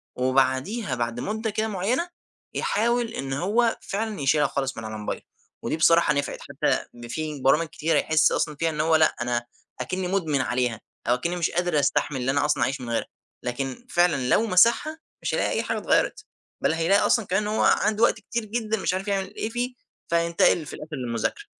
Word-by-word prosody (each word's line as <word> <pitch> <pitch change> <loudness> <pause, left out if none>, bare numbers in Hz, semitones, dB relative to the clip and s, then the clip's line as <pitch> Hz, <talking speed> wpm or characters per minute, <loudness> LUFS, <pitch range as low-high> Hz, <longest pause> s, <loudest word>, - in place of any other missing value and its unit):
وبعديها، 130 - +1
بعد 120 0 -2
مُدَّة 220 - -2
كده 215 +1 -1
معيّنة، 225 - -1 0.4
يحاول 235 +2 +1
إن 135 -6 -4
هو 220 - +1
فعلًا 210 -4 -3
يشيلها 145 +1 +3
خالص 135 -2 -3
من 115 - -6
على 110 0 -5
موبايله. 105 - -4 0.4
ودي - - -1
بصراحة 165 -1 +5
نفعِت، 140 0 -2
حتى - - -1 0.2
في 155 -1 -4
برامج 150 +5 +3
كتيرة 160 +2 0
يحس 160 0 +3
أصلًا 150 -2 0
فيها 165 +3 0
إن 150 -1 -2
هو 160 0 +3
لأ، 155 0 +4 0.7
أكنِّي 185 0 -2
مُدمن 165 -8 0
عليها 120 -3 -1 0.3
أو 120 - +4
أكنِّي 170 +8 -2
مش 170 -2 0
قادر 175 -3 +1
أستحمل 140 0 +1
اللي 130 +2 +1
أنا 145 +1 +1
أصلًا 150 -1 +2
أعيش 135 0 -1
من 120 - -6
غيرها، 115 - -1 0.4
لكن 135 - -4
فعلًا 160 - +2
لو 225 - +4
مسحها، 235 - +4 0.2
مش - - -2
هيلاقي - - 0
أي - - 0
حاجة - - -2
اتغيرت، - - +1 0.4
بل - - +2
هيلاقي 165 +5 +3
أصلًا 225 -4 +3
كمان 190 +3 0
أنه 215 +1 -2
هو - - +3
عنده 215 +1 +3
وقت - - +6
كتير 230 +1 -4
جدًا، 220 0 -2
مش 190 - -1
عارف 190 +2 -3
يعمل 195 0 -2
إيه 220 - -3
فيه، 245 +2 -2 0.4
فيتقل 170 -1 +3
في - - -9
الآخر 155 0 -7
للمذاكرة. 125 - -3
165 Hz, 190 wpm, -25 LUFS, 135-210 Hz, 0.7 s, وقت